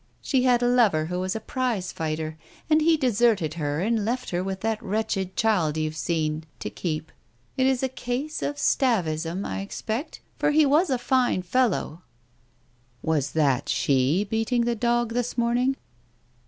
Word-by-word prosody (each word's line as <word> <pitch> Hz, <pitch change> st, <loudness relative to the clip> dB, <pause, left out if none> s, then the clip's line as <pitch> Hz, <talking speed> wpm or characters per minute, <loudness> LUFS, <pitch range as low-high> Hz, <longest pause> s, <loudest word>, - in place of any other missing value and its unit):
She 265 Hz, -3 st, +1 dB
had 245 Hz, -1 st, +4 dB
a -, -, +3 dB
lover 220 Hz, -11 st, +3 dB
who 180 Hz, +2 st, -3 dB
was 185 Hz, +2 st, -2 dB
a -, -, -1 dB
prize 225 Hz, -5 st, -2 dB
fighter, 155 Hz, 0 st, -3 dB, 0.4 s
and 310 Hz, +1 st, +5 dB
he 325 Hz, +1 st, +4 dB
deserted 230 Hz, -, +2 dB
her 150 Hz, -1 st, -2 dB
and 220 Hz, +2 st, +1 dB
left 250 Hz, +4 st, -2 dB
her 175 Hz, 0 st, -1 dB
with 190 Hz, 0 st, -4 dB
that 220 Hz, 0 st, -1 dB
wretched 195 Hz, -3 st, -2 dB
child 180 Hz, -9 st, +1 dB
you've 155 Hz, 0 st, -2 dB
seen, 155 Hz, 0 st, -1 dB
to -, -, -5 dB
keep.... 155 Hz, -2 st, -4 dB, 0.4 s
It 260 Hz, 0 st, +2 dB
is 265 Hz, -1 st, +1 dB
a -, -, +3 dB
case 260 Hz, +4 st, -4 dB
of 290 Hz, -, -2 dB
atavism, 180 Hz, -, 0 dB
I -, -, -3 dB
expect, 220 Hz, +7 st, -5 dB, 0.2 s
for -, -, +2 dB
he 305 Hz, +1 st, +5 dB
was 300 Hz, +5 st, +3 dB
a 260 Hz, -, +2 dB
fine 245 Hz, -6 st, +1 dB
fellow." 185 Hz, -5 st, 0 dB, 1.0 s
"Was 150 Hz, -3 st, 0 dB
that 145 Hz, -2 st, +1 dB
she 140 Hz, +7 st, +2 dB
beating 225 Hz, +3 st, 0 dB
the 240 Hz, -, +1 dB
dog 235 Hz, 0 st, 0 dB
this 245 Hz, 0 st, -2 dB
morning? 245 Hz, +3 st, +2 dB
215 Hz, 170 wpm, -25 LUFS, 160-245 Hz, 1.0 s, and